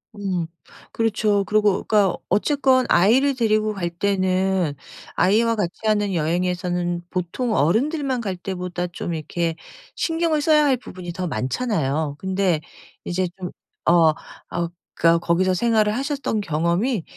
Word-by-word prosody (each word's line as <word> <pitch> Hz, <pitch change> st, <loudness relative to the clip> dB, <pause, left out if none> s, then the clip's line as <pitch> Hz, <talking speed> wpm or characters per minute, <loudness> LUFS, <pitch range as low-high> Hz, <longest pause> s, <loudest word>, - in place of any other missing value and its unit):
음 185 Hz, -5 st, -2 dB, 0.5 s
그렇죠. 210 Hz, -2 st, +1 dB
그러고 210 Hz, -1 st, +2 dB
그러니까 205 Hz, -4 st, +2 dB
어쨌건 265 Hz, +1 st, +3 dB
아이를 255 Hz, +10 st, +4 dB
데리고 215 Hz, -2 st, +1 dB
갈 175 Hz, -3 st, -2 dB
때는 185 Hz, -2 st, 0 dB, 0.4 s
아이와 225 Hz, +4 st, +3 dB
같이 180 Hz, -5 st, -1 dB
하는 205 Hz, -2 st, +1 dB
여행에서는 175 Hz, +1 st, -1 dB
보통 190 Hz, +6 st, -2 dB
어른들만 260 Hz, -, +1 dB
갈 190 Hz, -4 st, -3 dB
때보다 180 Hz, -1 st, -4 dB
좀 170 Hz, 0 st, -5 dB
이렇게 165 Hz, +1 st, -2 dB, 0.4 s
신경을 325 Hz, -2 st, 0 dB
써야 300 Hz, 0 st, +4 dB
할 265 Hz, -3 st, +3 dB
부분이 180 Hz, -6 st, -8 dB
더 180 Hz, 0 st, -3 dB
많잖아요. 150 Hz, -, -1 dB
근데 190 Hz, -4 st, 0 dB, 0.4 s
이제 180 Hz, +1 st, -1 dB
좀 180 Hz, -1 st, -6 dB, 0.4 s
어 165 Hz, -2 st, +5 dB, 0.4 s
어 170 Hz, 0 st, -1 dB, 0.3 s
그러니까 165 Hz, 0 st, +5 dB
거기서 185 Hz, +2 st, +2 dB
생활을 215 Hz, +1 st, +2 dB
하셨던 275 Hz, -5 st, -2 dB
경험이 170 Hz, -, 0 dB
190 Hz, 300 characters per minute, -22 LUFS, 175-225 Hz, 0.5 s, 어